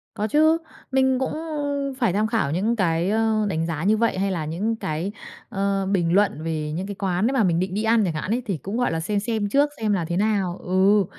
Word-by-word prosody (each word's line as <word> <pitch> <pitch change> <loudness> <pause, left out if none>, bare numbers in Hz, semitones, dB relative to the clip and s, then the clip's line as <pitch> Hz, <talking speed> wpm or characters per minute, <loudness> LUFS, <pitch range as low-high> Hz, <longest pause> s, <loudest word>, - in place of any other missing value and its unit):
Có 210 +1 -1
chứ, 315 +6 +4 0.3
mình 265 -1 +3
cũng, 265 - -1
ưm, 290 -3 -3
phải 235 -8 0
tham 215 +2 +1
khảo 220 - 0
những 210 +8 +1
cái, 175 -3 +1
ơ, 220 0 +1
đánh 160 -2 -1
giá 165 -1 -3
như 215 +2 +3
vậy, 230 -4 +1
hay 195 0 0
là 160 -4 -2
những 195 +9 -1
cái, 170 -1 -3 0.4
ơ, 195 -2 0
bình 175 -3 +1
luận 200 -6 +2
về 155 -2 -2
những 185 +5 -3
cái 200 - -5
quán 190 +2 0
đấy 270 - 0
mà 245 -5 +3
mình 170 -2 +2
định 185 0 -2
đi 215 +2 -1
ăn 225 -1 +3
chẳng 165 - -1
hạn 155 +7 -3
ấy, 245 +2 +1
thì 195 -7 -2
cũng, 195 - -5
gọi 245 - +1
là, 165 - -1
xem 200 +5 -1
xem 215 -1 -1
trước 285 +5 +3
xem 215 -2 0
là 175 -4 0
thế 170 +2 -2
nào. 195 -4 0
Ừ, 190 +2 +3
200 Hz, 250 wpm, -23 LUFS, 175-225 Hz, 0.4 s, chứ